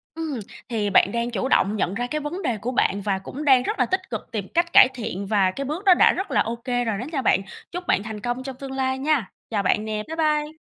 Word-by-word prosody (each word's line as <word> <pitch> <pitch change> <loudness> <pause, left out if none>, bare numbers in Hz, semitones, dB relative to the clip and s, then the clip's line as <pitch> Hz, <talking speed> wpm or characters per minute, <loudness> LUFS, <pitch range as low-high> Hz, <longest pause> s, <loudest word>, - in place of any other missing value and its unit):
Ừm, 315 -6 -3 0.3
thì 215 -3 -1
bạn 200 0 +4
đang 235 +1 -2
chủ 235 +4 -1
động 205 -5 +2
nhận 190 -2 -1
ra 245 +3 -2
cái 305 +3 -3
vấn 335 +7 -4
đề 235 -9 -1
của 235 +5 -3
bạn 200 -5 +1
và 195 -1 -1
cũng 280 +10 -7
đang 260 -3 +6
rất 425 - -3
là - - +4
tích 375 - -2
cực - - -6
tìm 205 -4 -3
cách 340 0 +1
cải 260 - +9
thiện 200 -5 -5
và 195 -3 +2
cái 275 +8 -5
bước 320 +9 -4
đó 375 - +8
đã - - +5
rất 385 - -4
là - - +3
OK 235 +2 -4
rồi 245 -2 0
đó 245 - -4
nha 275 -4 -1
bạn. 195 -5 +3 0.3
Chúc 355 0 -6
bạn 200 - +2
thành 215 -1 -6
công 245 +2 -3
trong 265 -1 -6
tương 270 -1 -7
lai 265 0 -1
nha. 280 -8 0 0.2
Chào 205 -3 -1
bạn 210 +3 +1
nè, 215 -1 -3
bye 320 - -5
bye! 305 -1 0
245 Hz, 275 wpm, -23 LUFS, 215-300 Hz, 0.3 s, cải